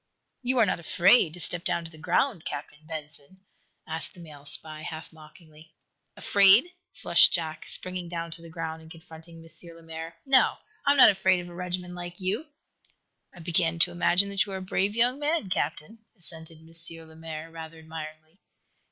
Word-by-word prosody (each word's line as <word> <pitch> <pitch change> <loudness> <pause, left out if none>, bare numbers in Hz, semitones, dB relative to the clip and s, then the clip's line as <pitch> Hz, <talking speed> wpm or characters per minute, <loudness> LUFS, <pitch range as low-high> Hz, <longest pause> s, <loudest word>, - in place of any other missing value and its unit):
"You 255 +1 -1
are 225 - +6
not 180 - -1
afraid 180 0 +4
to - - -9
step 175 +1 +1
down 170 - 0
to 165 - -9
the 160 - -14
ground, 185 - 0
Captain 145 +1 -7
Benson?" 155 +2 -8 0.4
asked 160 0 -4
the - - -14
male 150 -4 -11
spy, 155 +1 +5
half 160 +1 -8
mockingly. 155 0 -17 0.4
"Afraid?" 205 - +5 0.2
flushed - - +5
Jack, 160 -2 -3
springing 180 -1 -4
down 170 -1 -5
to 165 +1 -8
the 165 - -12
ground 160 -1 -5
and 160 - -15
confronting 165 0 -13
M. 165 +1 -9
Lemaire. 165 0 -9
"No; 270 -1 +4 0.3
I - - +7
am - - +4
not 255 - +9
afraid 190 -1 +2
of 175 0 -8
a - - -11
regiment 180 0 -4
like 175 0 -7
you!" 205 - -2 0.8
"I 175 - -14
begin 170 0 +1
to 175 +1 +5
imagine 175 +3 +3
that 200 -1 +2
you 195 - -7
are - - -3
a - - -7
brave 195 +2 -1
young 245 +4 +2
man, 295 - -1
Captain," 185 +5 -3 0.2
assented 165 -2 -6
M. 165 0 -7
Lemaire, 160 0 -9
rather 165 0 -9
admiringly. 160 +1 -10
170 Hz, 180 wpm, -27 LUFS, 160-185 Hz, 0.8 s, not